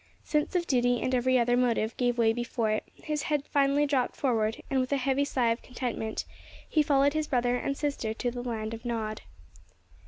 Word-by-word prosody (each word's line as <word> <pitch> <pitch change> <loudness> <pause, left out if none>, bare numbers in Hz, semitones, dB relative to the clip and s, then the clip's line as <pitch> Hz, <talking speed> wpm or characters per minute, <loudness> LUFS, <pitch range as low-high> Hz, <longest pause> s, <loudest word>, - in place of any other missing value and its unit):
Sense 300 +4 0
of 350 -1 +2
duty 245 -3 +2
and 255 - -1
every 255 +1 +3
other 245 0 +3
motive 235 -2 +1
gave 245 -1 0
way 225 -1 +4
before 240 -2 -1
it; 215 - 0
his 300 -1 -3
head 290 -1 -1
finally 280 +1 +2
dropped 275 -4 0
forward, 225 -5 0
and, 270 - +1
with 255 +1 -1
a 280 - +3
heavy 270 +1 +1
sigh 250 -5 +1
of 230 - -2
contentment, 240 -3 -4 0.4
he 310 - +3
followed 280 -1 +3
his 310 -1 -1
brother 245 -1 +1
and 275 +2 -2
sister 280 -7 -2
to 240 +2 -2
the 245 0 -5
land 225 -2 -3
of 230 - -7
Nod. 220 -3 -3
250 Hz, 200 wpm, -29 LUFS, 235-280 Hz, 0.4 s, way